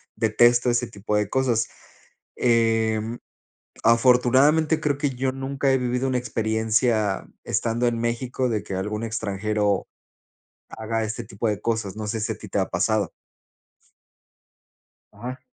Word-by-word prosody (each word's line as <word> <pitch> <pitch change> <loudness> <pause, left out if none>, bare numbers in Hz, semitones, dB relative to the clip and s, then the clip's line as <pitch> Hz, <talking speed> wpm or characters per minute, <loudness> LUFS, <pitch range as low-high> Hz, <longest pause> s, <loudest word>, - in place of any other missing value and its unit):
detesto 120 +2 +4
ese 120 0 0
tipo 105 -1 -3
de 105 -1 0
cosas, 125 -4 +1 0.7
em, 115 -1 +1 0.6
afortunadamente, 130 +7 +4
creo 145 -2 0
que 145 0 0
yo 130 +1 -1
nunca 135 0 -1
he - - +4
vivido 125 +1 -1
una 130 -1 +1
experiencia, 110 -2 0 0.2
estando 120 +1 0
en 115 -1 0
México, 120 +2 -1
de 105 -3 -1
que 95 - -5
algún 105 +4 -3
extranjero 105 -2 -1 0.8
haga 110 0 -3
este 110 +2 -4
tipo 110 +2 -3
de 105 - -2
cosas, 110 -4 -2
no 110 - -4
sé 110 +1 -2
si 110 +1 -1
a - - -12
ti 105 -2 -11
te 100 - 0
ha 95 - -1
pasado. 100 +1 0 2.0
Ajá. 125 +5 -7
115 Hz, 140 wpm, -24 LUFS, 110-125 Hz, 2.0 s, detesto